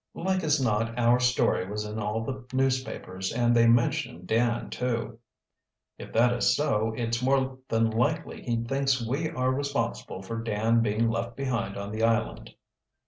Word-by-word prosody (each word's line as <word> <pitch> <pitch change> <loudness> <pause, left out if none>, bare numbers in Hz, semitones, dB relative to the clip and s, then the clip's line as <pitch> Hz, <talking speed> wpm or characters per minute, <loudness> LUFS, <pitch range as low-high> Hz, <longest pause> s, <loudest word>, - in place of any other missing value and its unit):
"Like 190 0 -1
as 155 -1 +2
not 115 -1 0
our 120 +1 +4
story 125 -6 +1
was 105 +1 -3
in 105 +1 -5
all 105 +1 -2
the 130 +1 -5
newspapers, 130 -8 -1
and 120 0 +2
they 115 0 +5
mentioned 115 -7 +1
Dan 115 +3 0
too." 115 -2 -3 0.8
"If - - -9
that 120 +2 +4
is 120 - +2
so, 115 -7 +1
it's 115 0 -1
more 130 0 +1
than 115 0 +2
likely 145 +8 -1
he 115 -1 -1
thinks 135 0 0
we 150 +6 -1
are 130 -5 0
responsible 130 -8 -3
for 115 +4 -4
Dan 115 +1 +1
being 110 +1 +1
left 115 +1 -3
behind 120 -7 -2
on 100 0 -5
the 110 +1 -3
island." 115 -1 0
115 Hz, 165 wpm, -27 LUFS, 110-130 Hz, 0.8 s, they